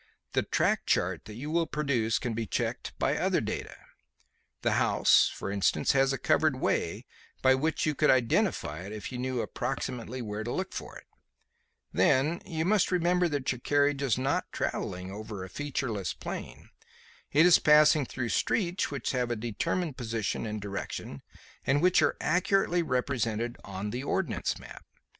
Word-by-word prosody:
The - - +3
track - - 0
chart - - +1
that 105 +1 -9
you 145 +6 -5
will 165 0 +1
produce 135 -8 0
can 120 - -3
be 115 0 -3
checked - - -2
by - - +1
other - - +1
data. - - -4 0.9
The - - +2
house, - - +4
for 100 - -5
instance, 100 -1 +2
has 135 0 +3
a 135 - -1
covered 155 +3 +2
way 130 - -1 0.4
by 130 0 +6
which 155 +5 0
you 155 - +1
could 150 +1 +2
identify 115 - +2
it 100 +4 -7
if 110 +3 -6
you 125 - -5
knew 130 -1 -1
approximately 130 -1 -4
where 105 0 -4
to 120 - -4
look 190 +6 -3
for - - -7
it. - - -15 0.9
Then 150 +6 +3
you 160 -3 -2
must 200 0 +3
remember 180 0 +2
that 145 -5 -1
your 125 - -5
carriage 145 +1 +2
is 130 -6 +1
not 130 +1 -1
travelling 90 +1 -3
over 105 -1 -6
a 95 - -8
featureless 120 -5 -3
plain. - - -7 0.6
It 155 +4 +5
is 180 - +7
passing 150 -2 +5
through 120 -2 -3
streets 180 - 0
which 135 -6 -3
have 125 -2 -1
a 120 - 0
determined 125 - -2
position 115 -2 -2
and 105 0 -4
direction 100 -8 -5 0.4
and 135 +2 +2
which 180 +3 +4
are - - +2
accurately 180 +1 +2
represented 120 -5 -1
on 100 +1 -5
the 125 +3 -3
ordnance 155 -2 -1
map. - - -12
130 Hz, 170 wpm, -29 LUFS, 110-155 Hz, 0.9 s, is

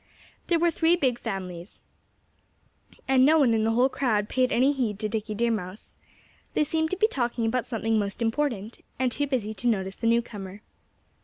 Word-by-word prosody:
There 340 - +3
were 340 +1 +2
three 325 +2 +3
big 255 -8 0
families. 185 -5 -6 1.3
And 265 -1 +4
no 310 +4 +6
one 265 -7 +4
in 220 -1 +1
the 225 - +2
whole 245 +3 +4
crowd 220 -6 0
paid 255 0 +1
any 265 +4 +3
heed 235 -7 -1
to 215 +1 -2
Dickie 215 0 -3
Deer 235 +2 +1
Mouse. 195 -2 -5 0.6
They - - +2
seemed 320 +1 0
to 375 - -2
be 430 - +4
talking 240 - -1
about 240 +2 -1
something 225 -2 0
most 200 -1 -3
important, 230 -2 -2
and 255 -1 +1
too 285 +4 -1
busy 235 -6 -2
to 220 +4 -3
notice 190 -4 0
the 230 - -1
newcomer. 210 -4 -2
235 Hz, 185 wpm, -26 LUFS, 210-265 Hz, 1.3 s, no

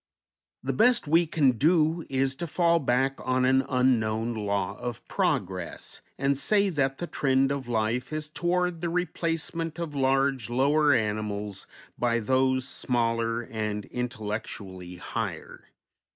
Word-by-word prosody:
The - - -1
best 240 -5 +4
we 165 +3 +4
can 150 -4 +3
do 160 +1 +3
is 135 0 +1
to 170 - -4
fall 170 +1 +3
back 135 0 +1
on 130 0 +1
an 130 +1 +4
unknown 115 -3 +1
"law 100 -3 -1
of 120 -2 -6
progress," 100 - -2 0.2
and 140 +1 +1
say 200 +8 +2
that 135 -4 0
the 175 - -3
trend 135 -4 +1
of 140 -3 -3
life 120 +3 -1
is 155 0 -3
toward 175 +1 -1
the 175 - -1
replacement 165 -1 -2
of 170 -3 -4
large, 135 -3 +1
lower 145 +4 +3
animals 105 -4 -1 0.3
by 120 -1 +2
those 130 +2 +1
smaller 115 -2 0
and 105 -3 -3
intellectually 105 -6 -5
higher. 90 - -5
130 Hz, 135 wpm, -27 LUFS, 115-155 Hz, 0.3 s, best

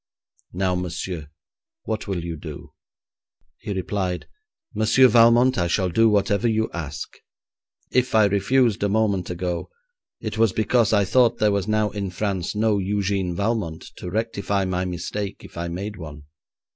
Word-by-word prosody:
Now, 90 +1 0
monsieur, 90 -3 -4 0.5
what 110 -1 -3
will 95 -4 -2
you 85 -1 -4
do?' 75 - -9 0.9
He - - -6
replied, 95 -1 -2 0.5
'Monsieur 125 +4 +5
Valmont, 120 +1 +5
I 85 - +1
shall 90 +1 +1
do 115 +6 +4
whatever 105 +2 +2
you 110 -1 0
ask. 75 -3 -6 0.7
If 125 -2 +1
I 110 -1 +6
refused 110 +3 +2
a 100 - +1
moment 100 -4 +1
ago, 90 0 -3 0.5
it 110 -1 -5
was 110 -4 +4
because 110 0 +2
I 105 -2 +3
thought 120 +4 +3
there 105 -1 +3
was 100 -1 -1
now 110 -1 +1
in 100 -2 -3
France 95 0 -2
no 105 -1 +2
Eugène 95 -2 -1
Valmont 100 -5 -2
to 90 - -6
rectify 100 -1 -1
my 90 0 -1
mistake 95 +3 -4
if - - -13
I 85 0 -3
made 100 +4 -5
one.' 75 -3 -9
100 Hz, 155 wpm, -23 LUFS, 90-110 Hz, 0.9 s, I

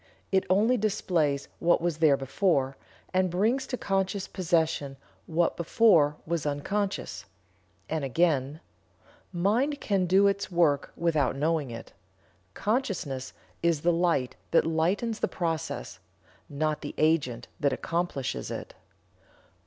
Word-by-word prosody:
It 190 -1 +2
only 215 +7 +4
displays 170 -9 0
what 170 +1 +3
was 170 -2 -2
there 150 -4 +5
before, 135 0 0 0.4
and 185 0 +2
brings 225 +10 +1
to 250 - -3
conscious 195 -1 -1
possession 160 -6 0 0.3
what 165 +1 +1
before 170 -5 +4
was 170 -2 -1
unconscious." 190 +8 -2 0.6
And 160 -2 -2
again: 145 0 +1 0.7
"Mind 235 +12 +1
can 195 -7 0
do 190 +3 +5
its 200 0 +1
work 160 -5 +2
without 155 -6 +1
knowing 150 -1 0
it. 115 -1 -9 0.6
Consciousness 195 - -2 0.3
is 170 -3 +1
the 175 +1 +3
light 165 -7 +1
that 170 - +4
lightens 180 +8 0
the - - +1
process, 165 -2 -3 0.5
not 150 +1 -1
the - - -6
agent 145 -7 +1
that 140 - +2
accomplishes 140 - -2
it." - - -6
170 Hz, 120 wpm, -28 LUFS, 145-195 Hz, 0.7 s, there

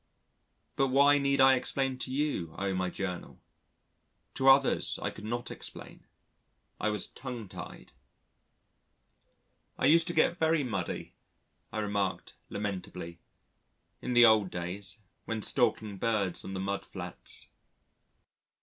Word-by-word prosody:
But 135 - +3
why 140 +2 +5
need 140 0 +1
I 135 0 +8
explain 130 0 0
to 130 - -4
you, 130 - -1
O 100 0 -1
my 95 0 -1
Journal? 90 -1 -5 0.9
To 135 - 0
others, 135 0 +5
I - - -2
could 105 - -10
not 120 +2 -3
explain. - - -9 0.7
I 110 - +1
was 105 0 -1
tongue 125 -5 -7
tied. - - -10 1.9
"I - - +1
used 165 +2 +5
to 170 - 0
get 165 +2 +3
very 160 -2 +3
muddy," 100 -8 -4 0.6
I - - -5
remarked 100 -3 -2 0.2
lamentably, 90 -4 -5 0.8
"in 125 - -2
the 120 0 +8
old 110 -4 +5
days 95 +4 -3 0.2
when 110 -2 -3
stalking 110 -5 +1
birds 105 -5 0
on 95 - -6
the - - -3
mudflats." 100 +1 -3
110 Hz, 125 wpm, -30 LUFS, 95-135 Hz, 1.9 s, I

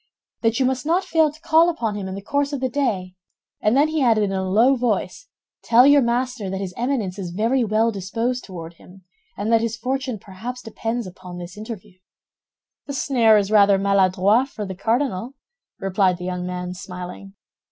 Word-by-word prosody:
"That 225 +1 +1
you 265 - +3
must 260 0 0
not 340 +5 +1
fail 320 -4 +2
to 305 - -17
call 330 +2 +4
upon 235 -11 -2
him 200 -2 -5
in 190 - -5
the 195 - -7
course 285 +5 0
of 280 - -2
the 260 0 -1
day; 210 -9 -1 0.5
and 215 +4 +2
then 290 +2 +5
he 310 -1 -1
added 225 -4 +3
in 200 - -1
a 190 -1 -1
low 235 +8 +4
voice, 245 - -2 0.3
'Tell 240 +2 +5
your 285 0 +6
master 240 -3 -1
that 190 0 -3
his 190 -2 -5
Eminence 235 -7 -2
is 180 -3 -4
very 225 +8 +1
well 220 +1 +2
disposed 230 +6 -2
toward 170 -3 -9
him, 185 +3 -17 0.3
and 215 +3 -1
that 225 - +5
his 230 -1 -2
fortune 255 0 -2
perhaps 220 +6 -8
depends 225 +1 -3
upon 185 -1 -10
this 175 +1 -8
interview.'" 210 -3 -9 0.9
"The 280 - -4
snare 235 -6 +4
is 205 0 0
rather 200 -2 +6
maladroit 200 +4 +3
for 215 -6 -6
the 190 - -5
cardinal," 230 +3 -1 0.4
replied 190 -1 +1
the 180 - -7
young 180 0 -3
man, 180 0 -4
smiling. 180 +1 -9
220 Hz, 195 wpm, -22 LUFS, 190-255 Hz, 0.9 s, your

